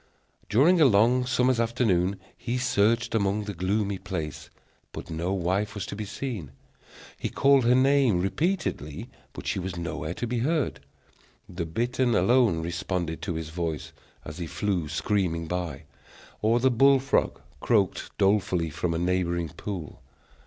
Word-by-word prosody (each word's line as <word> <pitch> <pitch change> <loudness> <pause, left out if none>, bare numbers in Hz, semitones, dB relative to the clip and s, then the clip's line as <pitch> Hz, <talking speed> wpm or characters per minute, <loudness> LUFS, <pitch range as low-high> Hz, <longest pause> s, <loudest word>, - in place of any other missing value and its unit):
During 155 - +4
a - - +8
long 125 +2 +4
summer's 125 0 +2
afternoon 100 -6 +1 0.2
he 125 +1 -3
searched 115 -2 +1
about 105 -1 0
the 105 - -4
gloomy 100 +2 -1
place, 80 -6 -5 0.4
but - - -8
no 85 +3 -2
wife 95 +3 -1
was 100 -2 -4
to - - -6
be 105 +1 -4
seen. 100 - -5 0.7
He - - -2
called 135 -2 +4
her 125 +1 +5
name 130 -6 +4
repeatedly, 115 - -2 0.2
but - - -9
she - - -1
was 90 -1 -4
nowhere 85 -1 -4
to - - -3
be 120 0 -2
heard. 150 +4 0 0.7
The 85 -2 -5
bittern 120 +6 0
alone 100 -4 +3
responded 85 -1 -3
to 85 - -3
his 80 -1 -4
voice, 80 -3 -4 0.3
as 75 +3 -8
he 85 - -4
flew 90 -3 -2
screaming 85 0 0
by; 85 -4 -4 0.6
or 115 +3 +3
the 130 +1 +3
bull 135 +3 +5
frog 135 +1 0 0.2
croaked 100 -6 +1
dolefully 95 -5 +2
from 85 +3 -2
a - - 0
neighboring 85 -1 0
pool. 90 -2 -7
100 Hz, 150 wpm, -26 LUFS, 85-120 Hz, 0.7 s, a